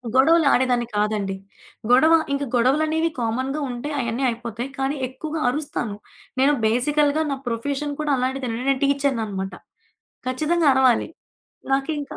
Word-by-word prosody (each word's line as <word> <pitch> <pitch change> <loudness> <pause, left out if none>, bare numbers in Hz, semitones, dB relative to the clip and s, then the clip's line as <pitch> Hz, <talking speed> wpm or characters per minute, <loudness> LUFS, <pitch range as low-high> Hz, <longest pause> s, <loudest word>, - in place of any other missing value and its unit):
గొడవలు 320 +5 +5
ఆడేదాన్ని 245 -2 +2
కాదండి. 210 -2 0 0.6
గొడవ 310 +6 +6 0.2
ఇంక 280 0 -1
గొడవలనేవి 310 +7 +2
కామన్‌గా 260 +5 -1
ఉంటే 245 +4 -5
అయన్నీ 235 +1 -2
అయిపోతాయి, 235 +1 -5
కానీ 270 +2 -1
ఎక్కువుగా 305 +5 -5
అరుస్తాను. 250 -6 -3 0.4
నేను 275 +2 +4
బేసికల్‌గా 290 +6 +2
నా 275 - -2
ప్రొఫెషన్ 280 +5 -2
కూడా 300 -1 0
అలాంటిదేనండి, 255 -2 -2
నేను 270 -1 +1
టీచర్ననమాట. 230 -9 -1 0.8
ఖచ్చితంగా 310 +5 +1
అరవాలి. 260 -3 +3 0.6
నాకింకా 285 +1 -2
265 Hz, 120 wpm, -23 LUFS, 240-295 Hz, 0.8 s, గొడవ